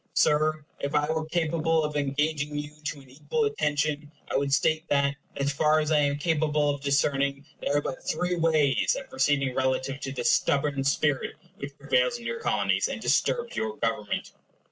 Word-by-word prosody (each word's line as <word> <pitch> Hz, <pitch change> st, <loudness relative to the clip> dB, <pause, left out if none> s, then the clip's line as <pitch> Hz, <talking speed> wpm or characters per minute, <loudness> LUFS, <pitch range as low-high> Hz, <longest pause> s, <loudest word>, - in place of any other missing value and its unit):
Sir, 155 Hz, 0 st, +2 dB
if 140 Hz, +2 st, -3 dB
I 150 Hz, +1 st, +2 dB
were 160 Hz, 0 st, -2 dB
capable 165 Hz, -1 st, +1 dB
of 150 Hz, 0 st, -3 dB
engaging 145 Hz, +1 st, -1 dB
you 150 Hz, 0 st, -4 dB
to 145 Hz, -1 st, -4 dB
an 135 Hz, -, -18 dB
equal 450 Hz, -, -1 dB
attention, 150 Hz, -, -1 dB, 0.2 s
I -, -, -1 dB
would 140 Hz, 0 st, +1 dB
state 155 Hz, +4 st, +2 dB
that, 140 Hz, 0 st, +2 dB, 0.2 s
as 140 Hz, 0 st, -1 dB
far 155 Hz, +2 st, +3 dB
as 155 Hz, 0 st, -1 dB
I 155 Hz, -, +4 dB
am 145 Hz, -1 st, +1 dB
capable 150 Hz, -2 st, +1 dB
of 140 Hz, -1 st, -5 dB
discerning, 140 Hz, 0 st, +1 dB
there 145 Hz, -, 0 dB
are -, -, +2 dB
but 135 Hz, -, -5 dB
three 180 Hz, 0 st, -1 dB
ways 160 Hz, -5 st, +2 dB
of 270 Hz, -, -12 dB
proceeding 140 Hz, -, +1 dB
relative 130 Hz, +1 st, -1 dB
to 135 Hz, -, -5 dB
this 125 Hz, -3 st, +1 dB
stubborn 140 Hz, -1 st, +1 dB
spirit 140 Hz, 0 st, +1 dB, 0.2 s
which -, -, -8 dB
prevails -, -, +1 dB
in -, -, -12 dB
your 475 Hz, -, -3 dB
Colonies, -, -, +1 dB
and -, -, -4 dB
disturbs 475 Hz, -1 st, 0 dB
your -, -, -2 dB
government. -, -, -2 dB
150 Hz, 185 wpm, -27 LUFS, 140-155 Hz, 0.2 s, I